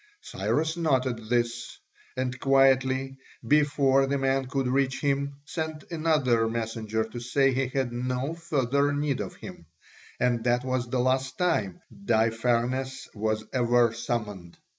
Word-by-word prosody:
Cyrus 160 - -1
noted 130 -8 0
this, 120 0 -1 0.4
and 130 -1 -2
quietly, 135 0 +3 0.3
before 140 -1 +3
the 140 +1 0
man 135 -1 0
could 135 0 -1
reach 130 0 +1
him, 140 0 -1
sent 160 -1 -4
another 150 -9 +2
messenger 110 -1 -2
to 110 +2 -7
say 135 +3 +2
he 135 +1 0
had 130 -2 -2
no 125 +4 -2
further 145 -4 0
need 145 -2 -1
of - - -6
him; 85 - -11 0.5
and 120 -2 +1
that 120 +1 +1
was 130 -1 -1
the 130 - -1
last 130 +1 0
time 110 - 0
Daïpharnes 120 +4 0
was 110 0 -1
ever 120 -2 +3
summoned. 110 -7 -4
130 Hz, 135 wpm, -27 LUFS, 120-135 Hz, 0.5 s, quietly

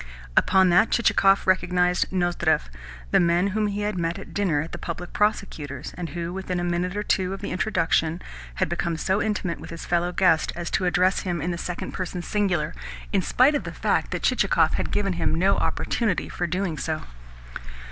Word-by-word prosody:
Upon 190 -1 +4
that 180 +6 +5
Chichikov 195 -4 +3
recognised 180 -1 +2
Nozdrev 175 - +1 0.4
the - - +5
man 175 +2 +3
whom 210 +2 0
he 205 0 -3
had 205 -3 -2
met 165 0 -1
at - - -10
dinner 190 -7 +1
at 165 - -6
the - - -6
Public 175 +1 -6
Prosecutor's, 155 -10 -2
and 175 -2 -5
who, 170 0 -4
within 185 -1 -3
a - - -2
minute 175 +2 -1
or 210 - -1
two 190 -1 0
of - - -11
the - - -4
introduction, 170 -4 +1 0.4
had - - 0
become 170 -1 -2
so 190 +4 0
intimate 190 -5 -2
with - - -10
his 165 0 -7
fellow 175 0 0
guest 175 -3 +3
as 175 -1 -5
to 185 - +1
address 185 +1 +2
him 175 -3 -2
in 175 +4 -2
the 170 - -3
second 175 -1 -4
person 180 -1 -4
singular, 180 -8 0 0.4
in 195 - +3
spite 255 - +4
of 290 - -1
the - - -6
fact - - 0
that - - -4
Chichikov - - +3
had - - -1
given 195 -2 0
him 160 - 0
no 190 +4 +3
opportunity 220 -7 -1
for 175 - -2
doing 175 -2 -2
so. 155 +1 -3
180 Hz, 200 wpm, -24 LUFS, 170-195 Hz, 0.4 s, that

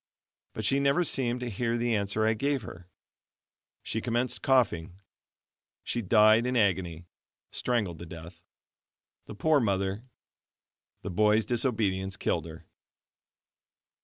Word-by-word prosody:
But - - -4
she 135 - +2
never 140 +5 +2
seemed 125 -6 -1
to 125 - -3
hear 115 +3 -1
the 120 -1 0
answer 100 +1 0
I 110 - +3
gave 140 +3 -1
her. 90 -2 -11 0.9
She 110 - -3
commenced 120 +1 -1
coughing 95 -10 +1 0.8
she 120 - -2
died 110 +3 +5
in 125 0 0
agony 90 -5 0 0.5
strangled 105 -10 -2
to 85 - -8
death. 85 +1 -11 0.9
The - - -8
poor 155 +7 +3
mother! 100 0 -1 1.0
The 100 - -4
boy's 105 +3 +3
disobedience 105 -6 0
killed 85 -6 -1
her. 80 0 -11
110 Hz, 125 wpm, -28 LUFS, 95-120 Hz, 1.0 s, died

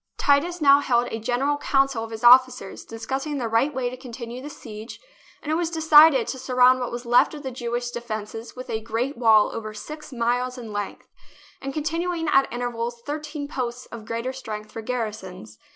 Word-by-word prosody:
Titus 325 +5 +2
now 280 -1 +7
held 245 -3 +1
a 225 - -3
general 255 +5 0
council 270 -5 +1
of 225 - -7
his 225 +1 -8
officers, 250 -3 +5
discussing 265 +6 -4
the 245 -4 -2
right 230 +6 +2
way 260 -3 -2
to 245 - -4
continue 245 -1 -8
the 290 - -7
siege, 220 -5 -10 0.4
and 305 - -3
it - - +2
was 335 0 0
decided 315 -5 +6
to 260 - -5
surround 255 0 +4
what 245 - -3
was 240 +1 -6
left 240 +5 +4
of 295 - -9
the 265 - -4
Jew 240 -1 -4
ish 240 0 -3
defences 225 -1 -6
with 255 0 -8
a 220 - -3
great 230 +5 -2
wall 225 -3 +4
over 215 -1 -6
six 300 +6 -9
miles 245 +1 -1
in 230 -4 -8
length 205 -1 -5 0.5
and 275 - -4
containing 325 +3 -2
at 270 -2 +3
intervals 240 0 -3
thirteen 295 0 -5
posts 250 -4 -4
of 230 -2 -8
greater 230 +3 -3
strength 215 -5 -7
for 225 - -6
garrisons. 215 -4 -5
245 Hz, 195 wpm, -24 LUFS, 230-280 Hz, 0.5 s, now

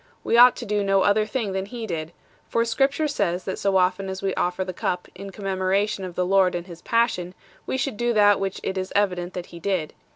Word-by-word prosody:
we - - +1
ought 245 +1 +8
to 240 - -7
do 210 -1 0
no 195 -1 +3
other 210 +2 +3
thing 215 -2 -2
than 190 0 -3
He 235 +1 -6
did; 165 -5 -4 0.4
for 230 0 +1
Scripture 270 +6 +1
says 190 -10 -1
that 190 - -4
so 195 -1 +2
often 185 +1 +1
as 190 +1 -6
we 195 -1 0
offer 180 +1 -1
the 185 - -5
Cup 180 0 -2
in 195 +2 -8
commemoration 195 +1 -1
of 180 -2 -6
the 180 - 0
Lord 190 -1 +3
and 175 0 -4
His 170 -3 -11
Passion, 220 -6 0 0.3
we - - -1
should 265 -4 -2
do 240 +1 +1
that 205 -2 +5
which 195 -1 -3
it 190 0 -2
is 185 - -5
evident 185 -3 0
that 180 -1 -4
He 170 - -8
did." 180 -4 -2
195 Hz, 235 wpm, -24 LUFS, 185-215 Hz, 0.4 s, ought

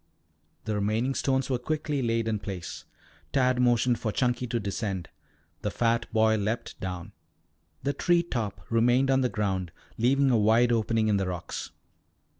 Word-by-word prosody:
The 110 - -1
remaining 110 +6 0
stones 130 0 0
were 130 -2 0
quickly 150 +1 -2
laid 115 -2 0
in 110 -2 0
place. 95 -4 -6 0.5
Tad 130 -2 +2
motioned 120 0 +3
for 110 - -1
Chunky 125 +1 0
to 120 0 -1
descend. 100 -3 -3 0.5
The - - -1
fat 115 0 0
boy 110 -1 +3
leaped 110 +3 -3
down. 90 -2 -5 0.7
The 140 - 0
tree 175 +1 +2
top 105 - -4
remained 120 +4 +3
on 135 0 +3
the 125 - +2
ground 95 -6 -2 0.3
leaving 135 +3 +3
a 115 - +4
wide 115 +3 +4
opening 115 -1 +1
in 105 -2 +3
the 95 -1 -1
rocks. 90 -2 -5
115 Hz, 160 wpm, -27 LUFS, 105-125 Hz, 0.7 s, a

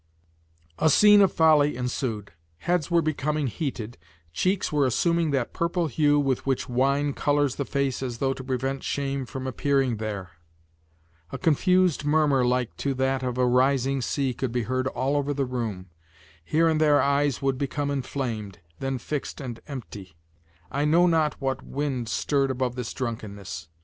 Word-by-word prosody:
A 160 - +4
scene 205 +4 +7
of 195 - +4
folly 150 -4 +4
ensued. 125 -4 -3 0.3
Heads 175 - -1
were 170 -1 +3
becoming 150 -1 -1
heated, 120 - -4 0.3
cheeks 185 - 0
were 145 -3 +2
assuming 170 +6 +1
that 135 -4 -1
purple 170 +1 0
hue 145 0 +2
with 135 -3 0
which 135 -1 -1
wine 140 +3 +1
colors 145 -2 +1
the 140 - -2
face 140 -2 -1
as 125 -3 -4
though 135 +2 0
to 130 - -9
prevent 135 +1 -2
shame 140 -2 -2
from 130 +1 -6
appearing 135 -2 0
there; 100 -5 -5 1.0
a - - -4
confused 180 0 +2
murmur 145 -3 +3
like 125 -1 0
to 140 -1 -1
that 130 0 0
of 125 -1 -3
a 125 - +3
rising 130 +2 +2
sea 135 +1 -1
could 125 0 -3
be 120 0 -1
heard 130 +3 -1
all 130 +2 -1
over 145 0 0
the 140 -1 0
room, 110 -8 -4 0.5
here 160 - +2
and 160 -1 +2
there 150 -2 +5
eyes 140 0 +1
would 135 -1 0
become 145 +1 -2
inflamed, 125 -7 -4 0.2
then 135 0 -2
fixed 145 +3 -5
and 125 -5 -6
empty; 105 - -8 0.6
I 140 +2 0
know 165 +4 +4
not 160 -3 +1
what 135 -2 -2
wind 135 -5 -3
stirred 135 +7 +1
above 130 -1 -1
this 125 -2 -5
drunkenness. 100 - -5
135 Hz, 165 wpm, -25 LUFS, 125-145 Hz, 1.0 s, scene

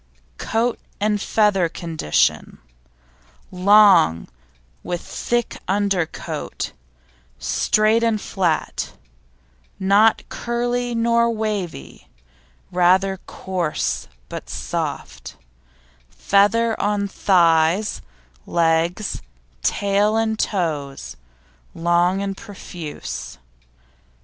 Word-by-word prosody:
COAT 230 +2 0 0.2
AND 210 0 +1
FEATHER 205 -5 +2
AND 165 - -5
CONDITION 160 - 0 0.9
Long, 190 - +5 0.5
with 175 -1 -3
thick 240 -1 -2
undercoat; 195 -4 -2 0.7
straight 215 - +2
and 230 -2 +1
flat, 180 -6 -2 0.9
not 200 +3 +3
curly 240 0 -2
nor 235 0 +3
wavy; 200 - -4 0.6
rather 185 +2 +3
coarse 180 -5 -2 0.2
but - - -8
soft; - - -5 0.7
feather 220 +3 +2
on 205 -1 0
thighs, 175 0 +2 0.5
legs, 170 +4 0 0.4
tail 205 - +1
and 220 -1 0
toes, 150 -8 -2 0.6
long 175 +3 +2
and 195 -1 -3
profuse. 180 -6 -8
195 Hz, 75 wpm, -21 LUFS, 170-215 Hz, 0.9 s, Long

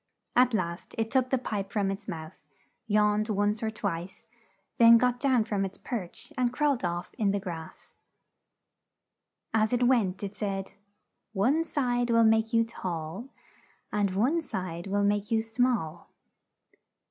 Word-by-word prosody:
At 250 -1 +4
last 170 -3 -3
it 225 0 -1
took 260 -2 +2
the 265 - +2
pipe 205 -5 -4
from 200 -2 0
its 195 +1 -7
mouth, 160 -5 -7 0.5
yawned 210 0 +2
once 205 +1 +1
or 220 - 0
twice, 195 -1 -5 0.5
then 230 0 +9
got 250 +1 +1
down 255 -4 +3
from 205 -3 -1
its 195 0 -5
perch 230 - -6
and 250 -3 +1
crawled 280 -2 +1
off 175 0 -3
in 210 -3 +2
the 200 +1 +1
grass. 170 -5 -8 1.6
As 220 +1 +2
it 245 0 +2
went 210 -7 +2
it 200 0 -5
said, 195 -2 -3 0.6
"One 260 +11 +2
side 245 -6 0
will 230 0 +5
make 220 0 +3
you 230 -1 +4
tall, 185 0 -5 0.6
and 200 -2 0
one 265 - +2
side 185 - -5
will 200 +1 +1
make 205 +1 +1
you 225 -2 +2
small. 225 -8 -1
215 Hz, 150 wpm, -28 LUFS, 195-245 Hz, 1.6 s, then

